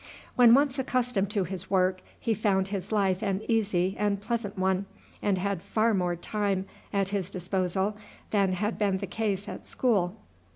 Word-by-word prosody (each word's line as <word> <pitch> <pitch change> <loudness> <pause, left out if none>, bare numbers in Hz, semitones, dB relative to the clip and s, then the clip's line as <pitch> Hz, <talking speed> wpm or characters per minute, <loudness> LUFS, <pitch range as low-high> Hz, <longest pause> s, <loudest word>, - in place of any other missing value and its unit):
When 240 -1 +8
once 280 -1 +2
accustomed 250 -6 0
to 205 -2 +1
his 185 +1 -6
work 185 -1 +2 0.2
he 230 - +1
found 195 -2 +1
his 195 -1 -4
life 195 -3 +2
an 200 -1 -1
easy 195 -5 +1
and 205 -1 +1
pleasant 215 -1 -3
one, 190 +1 +1 0.3
and 200 -2 +1
had 195 -1 -1
far 225 +4 +1
more 180 -3 +1
time 195 +1 -1 0.3
at 195 -1 +1
his 195 -2 -2
disposal 190 +2 -1 0.4
than 195 -3 +3
had 210 +4 -2
been 200 -3 +2
the 200 - -4
case 205 0 -2
at - - -7
school. 200 -7 +1
200 Hz, 170 wpm, -28 LUFS, 190-215 Hz, 0.4 s, When